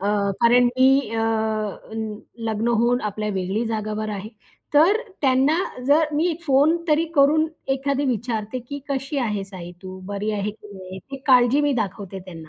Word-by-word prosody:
अ, 200 - -2 0.3
कारण 240 +1 +5
मी 270 -1 +4
अ, 225 - 0 1.3
लग्न 220 +2 -1
होऊन 235 +1 +2
आपल्या 210 0 -3
वेगळी 190 +5 -1
जागेवर 215 -1 -3
आहे. 205 +1 -5 0.5
तर 340 +9 +6 0.3
त्यांना 270 +4 +3 0.3
जर 305 +1 +3
मी 330 +2 +1
फोन 285 +5 +4
तरी 310 +2 +3
करून 300 +3 +4 0.2
एखादी 275 +1 0
विचारते, 235 -1 -2
की 285 0 -5
"कशी 275 +1 -3
आहेस 205 -5 -2
आई 175 -1 -8
तू? 185 0 -8
बरी 205 +1 -3
आहे 205 0 -2
की 210 0 -15
नाही"? 185 0 -9
ती 275 - -5
काळजी 250 +2 +5
मी 290 -1 +2
दाखवते 200 -3 -4
त्यांना. 165 -4 -10
235 Hz, 160 wpm, -23 LUFS, 205-280 Hz, 1.3 s, तर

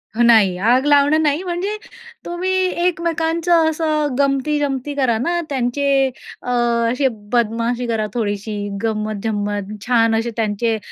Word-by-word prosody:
हं, 240 - +2
नाही 215 -6 +5
आग 255 +4 +3
लावणं 290 +2 +4
नाही 295 +2 +1
म्हणजे, 365 +3 -3 0.5
तुम्ही 350 +2 -2 0.3
एकमेकांचं 335 -1 +1
असं 305 -3 -1
गंमतीजमती 280 0 0
करा 255 -5 +1
ना. 340 +9 -1
त्यांचे 270 +1 +1 0.3
अ, 250 - -6 0.4
असे 270 +2 +1 0.3
बदमाशी 235 +1 0
करा 225 -2 -1
थोडीशी, 210 -2 -3 0.3
गंमत-जंमत 210 -2 -2 0.2
छान 230 -2 +3
असे 225 +1 -1
त्यांचे, 220 +1 0
255 Hz, 120 wpm, -19 LUFS, 225-305 Hz, 0.5 s, नाही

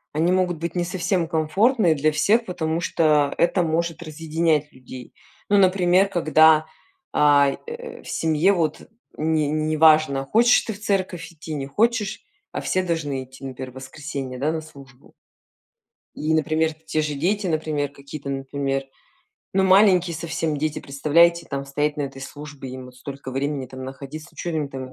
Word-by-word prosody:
Они 165 +3 +2
могут 180 -3 +1
быть 170 +1 -4
не 175 -1 0
совсем 180 -1 -1
комфортные 175 - +2
для 155 +1 +1
всех, 210 +10 +3
потому 165 -3 -2
что 150 -4 +2
это 175 +1 +2
может 165 0 -1
разъединять 155 -1 -1
людей. 130 -1 -11 0.4
Ну, 205 - +4
например, 185 0 +4
когда, 160 -3 +4 0.4
а, 145 -1 +4 0.2
э, 470 +1 -8
в - - -15
семье 160 +4 +2
вот 160 -5 -1 0.4
не 155 -1 +1
неважно, 155 -2 +3
хочешь 235 - +4
ты - - -5
в 205 - -8
церковь 185 -4 -2
идти, 160 0 -8
не 140 -2 -3
хочешь, 215 - 0 0.3
а - - -3
все 185 - 0
должны 150 -7 -2
идти, 130 +1 -16
например, 130 -1 -7
в - - -22
воскресенье, 135 -1 -6
да, 150 +4 0
на 160 - -3
службу. 140 -4 -16 1.0
И, 155 +1 0
например, 160 0 +1
те 155 0 0
же 150 -1 -2
дети, 190 +8 0
например, 155 -3 -1
какие-то, 140 0 -8
например, 135 0 -2 0.7
ну, 190 - +2
маленькие 185 -3 +4
совсем 165 -1 -2
дети, 155 +1 -2
представляете, 165 +4 +3
там 140 -1 -3
стоять 145 +2 -1
на 150 - -2
этой 135 -1 -6
службе, 140 -1 -9
им 130 0 -8
вот 125 0 -15
столько 135 +1 -8
времени 135 0 -2
там 130 +1 -9
находиться, 140 +3 -9
чё 175 - -4
им 155 -3 -2
там 130 -1 -7
155 Hz, 165 wpm, -23 LUFS, 140-170 Hz, 1.0 s, Ну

